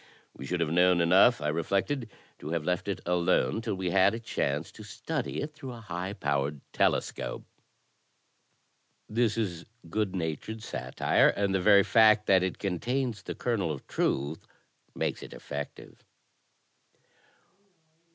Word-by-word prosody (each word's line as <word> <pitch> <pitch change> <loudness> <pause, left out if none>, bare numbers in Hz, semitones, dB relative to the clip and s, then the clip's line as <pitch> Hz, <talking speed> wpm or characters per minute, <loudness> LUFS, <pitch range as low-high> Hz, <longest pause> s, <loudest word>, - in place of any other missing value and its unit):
We 70 - -8
should 90 +2 -1
have 80 -2 0
known 90 +1 +4
enough, 90 +7 +5
I 75 - 0
reflected, 100 - -1 0.3
to 75 - -7
have 85 -1 -1
left 90 +1 -1
it 100 - -3
alone 85 - +1
till 110 -3 -2
we 95 -2 -2
had 95 +3 +4
a - - -5
chance 75 -9 -2
to - - -13
study 125 +7 -4
it 150 +1 -6
through 135 -4 -8
a 120 - -9
high 90 -1 -5
powered 70 -4 -1
telescope. - - 0 1.6
This 115 0 +1
is 90 -7 -2 0.3
good 105 -2 -1
natured 95 +6 -4
satire, 65 - +1
and 100 -1 +1
the 95 - +1
very 100 0 +6
fact 110 -1 +5
that 95 -1 +5
it 95 -1 -2
con 95 -4 -2
tains 125 -4 -2
the - - -5
kernel 105 -9 -1
of 70 - -7
truth 70 +4 -2 0.5
makes - - -2
it - - -9
effective. 70 0 -8
95 Hz, 150 wpm, -29 LUFS, 85-110 Hz, 1.6 s, very